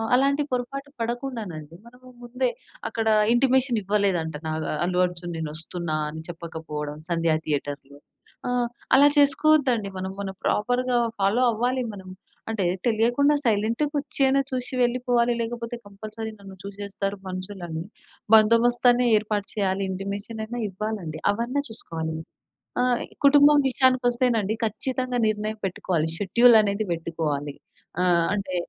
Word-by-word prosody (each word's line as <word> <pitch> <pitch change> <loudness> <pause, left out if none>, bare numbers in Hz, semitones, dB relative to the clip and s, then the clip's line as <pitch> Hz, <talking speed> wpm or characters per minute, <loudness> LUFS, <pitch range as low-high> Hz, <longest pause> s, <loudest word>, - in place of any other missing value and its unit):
అలాంటి 280 +3 +2
పొరపాటు 275 +3 -3
పడకుండానండి 225 - -5
మనము 250 +1 -16
ముందే 250 +1 -1 0.4
అక్కడ 225 0 -2 0.3
ఇంటిమేషన్ 255 -1 +3
ఇవ్వలేదంట 190 -6 0
నాగ 155 0 -2
ఆహ్, - - -4
'అల్లు 180 0 +1
అర్జున్' 175 -1 -7
నేనొస్తున్నా 160 +1 -4
అని 160 +1 -8
చెప్పకపోవడం 160 -3 -6
'సంధ్యా 165 -2 +2
థియేటర్‌లో'. 145 -1 -4 0.5
ఆ! - - -1 0.5
అలా 285 +1 +7
చేసుకోవద్దండి 280 -6 +4
మనం, 190 +1 -4
మనం 195 -1 -5
ప్రాపర్‌గా 245 +3 +1 0.2
ఫాలో 200 +6 +2
అవ్వాలి 250 +3 0
మనం. 190 -1 -11 0.4
అంటే 215 -4 -1 0.2
తెలియకుండా 240 +6 +3
సైలెంట్‌గా 230 +5 +1
ఒచ్చయిన 275 -1 +1
చూశి 255 0 -3
వెళ్ళిపోవాలి. 245 -1 +2
లేకపోతే 235 +1 -4
కంపల్సరీ 215 +2 -7
నన్ను 195 -1 -11
చూశేస్తారు 200 0 -4
మనుషులని, 185 -3 -5 0.5
బందోబస్తన్ని 240 +3 +5
ఏర్పాటు 210 -1 -2
చేయాలి. 195 -2 0
ఇంటిమేషన్ 200 +4 -5
అయినా 240 +2 -5
ఇవ్వాలండి. 190 -5 -4
అవన్నా 240 +6 -1
చూసుకోవాలి. 160 -7 -4 0.7
ఆ! - - +3 0.4
కుటుంబం 290 +1 +7
విషయానికొస్తేనండి 245 -4 +2
ఖచ్చితంగా 255 +3 -2
నిర్ణయం 215 0 -2
పెట్టుకోవాలి. 175 -3 -1
షెడ్యూల్ 235 +6 +5
అనేది 205 +1 -1
వెట్టుకోవాలి. 160 -4 -3 0.5
ఆహ్, 175 -2 +3
అంటే 195 -3 -3
215 Hz, 115 wpm, -25 LUFS, 180-245 Hz, 0.7 s, అలా